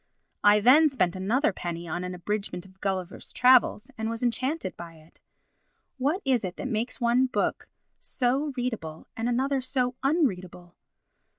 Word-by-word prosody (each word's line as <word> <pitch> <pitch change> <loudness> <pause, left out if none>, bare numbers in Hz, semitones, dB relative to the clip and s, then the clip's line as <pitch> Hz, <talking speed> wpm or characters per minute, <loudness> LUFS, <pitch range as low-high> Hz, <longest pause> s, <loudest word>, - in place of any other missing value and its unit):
I 210 0 +6
then 290 +8 +6
spent 185 -11 0
another 215 +6 +1
penny 170 -1 -5
on 175 +3 -3
an 180 0 -5
abridgement 190 0 -4
of 190 0 -19
Gulliver's 190 -3 -3
Travels, 250 -1 +4
and 220 0 -1
was 230 +1 -4
enchanted 255 - -1
by 170 -1 -10
it. 155 +1 -21 0.8
What 300 +10 0
is 255 -4 +2
it 185 -1 -5
that - - -4
makes 235 +1 -2
one 245 +2 +3
book 250 - -2 0.3
so 270 +4 -1
readable 215 -11 -4
and 230 +2 -2
another 265 +3 0
so 255 -1 0
unreadable? 185 - -1
230 Hz, 155 wpm, -27 LUFS, 185-260 Hz, 0.8 s, I